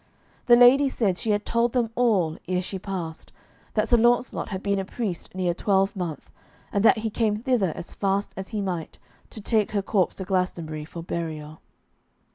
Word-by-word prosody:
The 240 Hz, -, +8 dB
ladies 260 Hz, +3 st, +6 dB
said 195 Hz, -6 st, +1 dB
she 225 Hz, -, -2 dB
had 205 Hz, 0 st, +1 dB
told 235 Hz, 0 st, +1 dB
them 240 Hz, -3 st, +1 dB
all, 205 Hz, -10 st, +2 dB
ere 180 Hz, 0 st, 0 dB
she 190 Hz, +1 st, -5 dB
passed, 175 Hz, -4 st, -6 dB, 0.4 s
that 215 Hz, 0 st, +2 dB
Sir 240 Hz, -, +5 dB
Launcelot 240 Hz, +2 st, +2 dB
had 190 Hz, -2 st, -5 dB
been 200 Hz, -1 st, +1 dB
a -, -, -1 dB
priest 190 Hz, -4 st, -5 dB
near 180 Hz, -2 st, +1 dB
a -, -, -2 dB
twelvemonth, 190 Hz, -3 st, -1 dB, 0.4 s
and 200 Hz, -, +1 dB
that 225 Hz, -, +6 dB
he 220 Hz, 0 st, -2 dB
came 215 Hz, -1 st, +1 dB
thither 230 Hz, -, +1 dB
as -, -, -8 dB
fast 200 Hz, 0 st, -1 dB
as 190 Hz, 0 st, -6 dB
he 215 Hz, -2 st, -3 dB
might, 180 Hz, -5 st, -4 dB, 0.3 s
to -, -, -9 dB
take 215 Hz, 0 st, +1 dB
her 200 Hz, -2 st, 0 dB
corpse 190 Hz, -3 st, +1 dB
to 190 Hz, -, -4 dB
Glastonbury 170 Hz, -5 st, -2 dB
for 165 Hz, +1 st, -8 dB
burial. 155 Hz, -3 st, -5 dB
195 Hz, 190 wpm, -25 LUFS, 180-225 Hz, 0.4 s, The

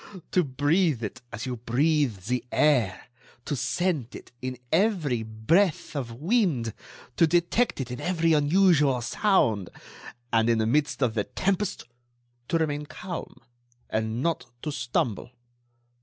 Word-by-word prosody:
To 180 Hz, -, +3 dB
breathe 145 Hz, 0 st, +1 dB
it 105 Hz, -, -5 dB
as 115 Hz, -1 st, -5 dB
you 125 Hz, -1 st, -3 dB
breathe 125 Hz, -, +1 dB
the 125 Hz, +3 st, -1 dB
air, 120 Hz, -11 st, +2 dB, 0.4 s
to 145 Hz, -, -1 dB
scent 150 Hz, -3 st, -1 dB
it -, -, -11 dB
in 130 Hz, 0 st, -4 dB
every 160 Hz, -, +2 dB
breath 130 Hz, -, +1 dB
of 130 Hz, -5 st, -3 dB
wind, 155 Hz, -, +1 dB, 0.4 s
to 165 Hz, -, +5 dB
detect 175 Hz, +8 st, +1 dB
it 125 Hz, -2 st, -4 dB
in 125 Hz, -, -5 dB
every 165 Hz, -2 st, +2 dB
unusual 150 Hz, -4 st, +4 dB
sound.... 115 Hz, -, +1 dB, 0.6 s
And, 115 Hz, 0 st, +3 dB
in 115 Hz, -, +3 dB
the 110 Hz, -, +1 dB
midst 145 Hz, +3 st, +1 dB
of 120 Hz, -3 st, +1 dB
the 105 Hz, -3 st, -1 dB
tempest, 195 Hz, +1 st, -1 dB, 0.6 s
to 165 Hz, -, +1 dB
remain 150 Hz, -2 st, -1 dB
calm... 180 Hz, -5 st, -7 dB, 0.5 s
and 110 Hz, +3 st, -1 dB
not 165 Hz, -6 st, -1 dB, 0.2 s
to 150 Hz, -, -2 dB
stumble! 125 Hz, -, -2 dB
145 Hz, 140 wpm, -26 LUFS, 120-170 Hz, 0.6 s, to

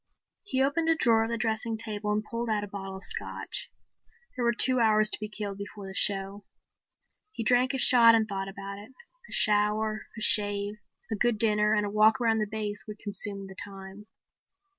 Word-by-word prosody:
He 265 Hz, -10 st, 0 dB
opened 320 Hz, +4 st, 0 dB
a 325 Hz, -, +4 dB
drawer 225 Hz, -6 st, +3 dB
of -, -, -6 dB
the 235 Hz, -, -2 dB
dressing 225 Hz, 0 st, -2 dB
table 210 Hz, -2 st, -4 dB
and 210 Hz, 0 st, -1 dB
pulled 230 Hz, +1 st, -5 dB
out 210 Hz, -1 st, 0 dB
a -, -, -6 dB
bottle 195 Hz, -1 st, -7 dB
of 190 Hz, -, -11 dB
Scotch. -, -, -4 dB, 0.7 s
There 250 Hz, -, -3 dB
were 235 Hz, -, +3 dB
two 255 Hz, +2 st, +4 dB
hours 215 Hz, -2 st, +4 dB
to -, -, +1 dB
be 215 Hz, 0 st, -6 dB
killed 205 Hz, -2 st, -6 dB
before 200 Hz, 0 st, -8 dB
the 190 Hz, -, -8 dB
show. 195 Hz, 0 st, 0 dB, 0.9 s
He 235 Hz, -, -5 dB
drank 250 Hz, +4 st, +2 dB
a -, -, 0 dB
shot 235 Hz, -3 st, +7 dB
and 220 Hz, -1 st, +1 dB
thought 195 Hz, -2 st, -4 dB
about 200 Hz, 0 st, -8 dB
it. 205 Hz, -, -13 dB
A 475 Hz, -, -22 dB
shower, 215 Hz, +1 st, +1 dB
a -, -, -7 dB
shave, 205 Hz, -1 st, +2 dB, 0.3 s
a -, -, 0 dB
good 240 Hz, +1 st, +1 dB
dinner 210 Hz, -1 st, +2 dB
and 210 Hz, -1 st, 0 dB
a -, -, -3 dB
walk 215 Hz, +4 st, +4 dB
around 225 Hz, -2 st, +1 dB
the 215 Hz, -, -1 dB
base 205 Hz, -2 st, -4 dB
would 210 Hz, 0 st, -8 dB
consume 205 Hz, -1 st, -6 dB
the 190 Hz, -, -11 dB
time. 195 Hz, +1 st, -9 dB
215 Hz, 205 wpm, -27 LUFS, 205-230 Hz, 0.9 s, shot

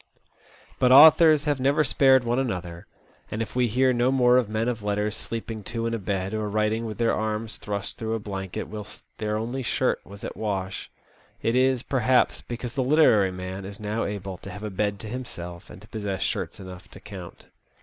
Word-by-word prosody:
But 125 Hz, -, +4 dB
authors 155 Hz, +2 st, +8 dB
have 145 Hz, -3 st, 0 dB
never 140 Hz, +4 st, +3 dB
spared 135 Hz, -2 st, +4 dB
one 120 Hz, +2 st, 0 dB
another, 90 Hz, -9 st, -4 dB, 0.4 s
and 110 Hz, -, -4 dB
if 115 Hz, -, -4 dB
we 125 Hz, -1 st, +3 dB
hear 130 Hz, +3 st, +2 dB
no 120 Hz, +2 st, +2 dB
more 125 Hz, -2 st, +4 dB
of 120 Hz, -4 st, +1 dB
men 110 Hz, +2 st, -1 dB
of 120 Hz, -3 st, -2 dB
letters 105 Hz, +1 st, -1 dB
sleeping 115 Hz, 0 st, -5 dB
two 115 Hz, +3 st, -3 dB
in 115 Hz, -, -1 dB
a 115 Hz, -, -1 dB
bed, 95 Hz, 0 st, -2 dB
or 110 Hz, -1 st, -2 dB
writing 110 Hz, +2 st, 0 dB
with 110 Hz, -, -6 dB
their 115 Hz, -1 st, +2 dB
arms 110 Hz, +1 st, -2 dB
thrust 100 Hz, -1 st, -5 dB
through 110 Hz, 0 st, -2 dB
a -, -, -2 dB
blanket 95 Hz, -3 st, -5 dB
whilst 105 Hz, 0 st, -9 dB, 0.2 s
their 105 Hz, 0 st, -1 dB
only 120 Hz, +4 st, -3 dB
shirt 130 Hz, +1 st, 0 dB
was 100 Hz, +1 st, -12 dB
at -, -, -5 dB
wash, 95 Hz, -3 st, -3 dB, 0.5 s
it 115 Hz, -, +1 dB
is, 130 Hz, -1 st, +2 dB
perhaps, 130 Hz, -1 st, +2 dB
because 120 Hz, 0 st, -6 dB
the 130 Hz, -, 0 dB
literary 125 Hz, -9 st, +4 dB
man 95 Hz, +1 st, -6 dB
is 100 Hz, +2 st, -8 dB
now 105 Hz, +2 st, -2 dB
able 100 Hz, -2 st, -5 dB
to -, -, -10 dB
have 100 Hz, +3 st, -8 dB
a 105 Hz, -, -4 dB
bed 100 Hz, +1 st, -1 dB
to 110 Hz, -, -7 dB
himself, 90 Hz, -8 st, -7 dB
and 95 Hz, -, -12 dB
to -, -, -15 dB
possess 100 Hz, -4 st, -3 dB
shirts 100 Hz, -, -3 dB
enough 95 Hz, -1 st, -10 dB
to -, -, -13 dB
count. 95 Hz, -4 st, -10 dB
110 Hz, 205 wpm, -25 LUFS, 100-125 Hz, 0.5 s, authors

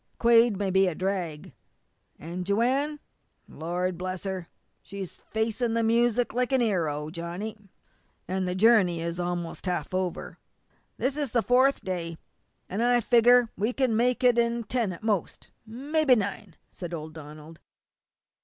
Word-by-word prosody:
Quade 230 Hz, -2 st, +5 dB
may 195 Hz, -1 st, -1 dB
be 190 Hz, +1 st, +4 dB
a 175 Hz, -, -2 dB
drag. 180 Hz, -5 st, -3 dB, 0.6 s
An' 175 Hz, +3 st, -6 dB
Joanne, 260 Hz, +10 st, +1 dB, 0.5 s
Lord 175 Hz, +2 st, -3 dB
bless 185 Hz, 0 st, -4 dB
her! 190 Hz, -3 st, -4 dB, 0.3 s
she's 195 Hz, -2 st, -8 dB
facing 225 Hz, +1 st, -1 dB
the 230 Hz, -, +1 dB
music 235 Hz, +1 st, +2 dB
like 250 Hz, +2 st, 0 dB
an' 265 Hz, -, +3 dB
'ero, 160 Hz, -9 st, 0 dB
Johnny!" 175 Hz, +6 st, -5 dB, 0.7 s
"And 185 Hz, 0 st, -1 dB
the 180 Hz, -, -2 dB
journey 190 Hz, -5 st, +4 dB
is 170 Hz, +1 st, -4 dB
almost 175 Hz, 0 st, -4 dB
half 175 Hz, -2 st, -2 dB
over." 185 Hz, -1 st, -3 dB, 0.6 s
"This 265 Hz, +1 st, -1 dB
is 285 Hz, -5 st, -2 dB
the 235 Hz, -2 st, +2 dB
fourth 260 Hz, +3 st, +3 dB
day. 170 Hz, -3 st, -3 dB, 0.5 s
I 240 Hz, +5 st, +2 dB
figger 240 Hz, 0 st, +5 dB
we 215 Hz, +6 st, -1 dB
can 255 Hz, -4 st, +1 dB
make 250 Hz, +2 st, +1 dB
it 245 Hz, -1 st, +5 dB
in 235 Hz, 0 st, +1 dB
ten 230 Hz, -3 st, -1 dB
at 180 Hz, -, -9 dB
most, 210 Hz, -6 st, -2 dB, 0.2 s
mebby 275 Hz, +4 st, +2 dB
nine," 200 Hz, -3 st, -4 dB, 0.2 s
said 175 Hz, -2 st, -6 dB
old 155 Hz, 0 st, -7 dB
Donald. 155 Hz, +1 st, -11 dB
200 Hz, 145 wpm, -27 LUFS, 175-240 Hz, 0.7 s, Quade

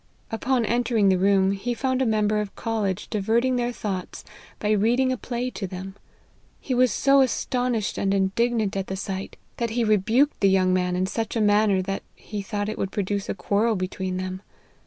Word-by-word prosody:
Upon 240 Hz, +1 st, 0 dB
entering 230 Hz, -3 st, +2 dB
the 185 Hz, -1 st, +3 dB
room, 195 Hz, 0 st, +3 dB
he 220 Hz, +5 st, -2 dB
found 260 Hz, +1 st, 0 dB
a 260 Hz, -, +2 dB
member 215 Hz, -1 st, +2 dB
of 205 Hz, -2 st, -6 dB
college 215 Hz, -5 st, -2 dB
diverting 230 Hz, +5 st, +1 dB
their 245 Hz, 0 st, 0 dB
thoughts 195 Hz, -6 st, -5 dB, 0.3 s
by 210 Hz, -, -1 dB
reading 235 Hz, +5 st, +3 dB
a -, -, +1 dB
play 245 Hz, +1 st, -4 dB
to 195 Hz, -, -5 dB
them. 190 Hz, +1 st, -7 dB, 0.7 s
He 260 Hz, -, -3 dB
was 250 Hz, -1 st, +4 dB
so 275 Hz, +6 st, +4 dB
astonished 250 Hz, -3 st, 0 dB
and 195 Hz, -, +1 dB
indignant 200 Hz, +2 st, +1 dB
at 195 Hz, -1 st, -2 dB
the 190 Hz, -, -3 dB
sight, 195 Hz, 0 st, -5 dB, 0.2 s
that 235 Hz, -1 st, -1 dB
he 235 Hz, +2 st, 0 dB
rebuked 220 Hz, +7 st, +2 dB
the 195 Hz, -, +4 dB
young 185 Hz, -1 st, +3 dB
man 180 Hz, -1 st, +1 dB
in 185 Hz, +1 st, +1 dB
such 225 Hz, +4 st, -3 dB
a -, -, +1 dB
manner 205 Hz, -2 st, +3 dB
that 195 Hz, +1 st, -3 dB
he 210 Hz, -2 st, -6 dB
thought 205 Hz, 0 st, -3 dB
it 215 Hz, -, -4 dB
would 195 Hz, -, -2 dB
produce 200 Hz, 0 st, -2 dB
a -, -, -1 dB
quarrel 215 Hz, +3 st, +1 dB
between 185 Hz, 0 st, -3 dB
them. 185 Hz, 0 st, -4 dB
210 Hz, 195 wpm, -24 LUFS, 195-235 Hz, 0.7 s, was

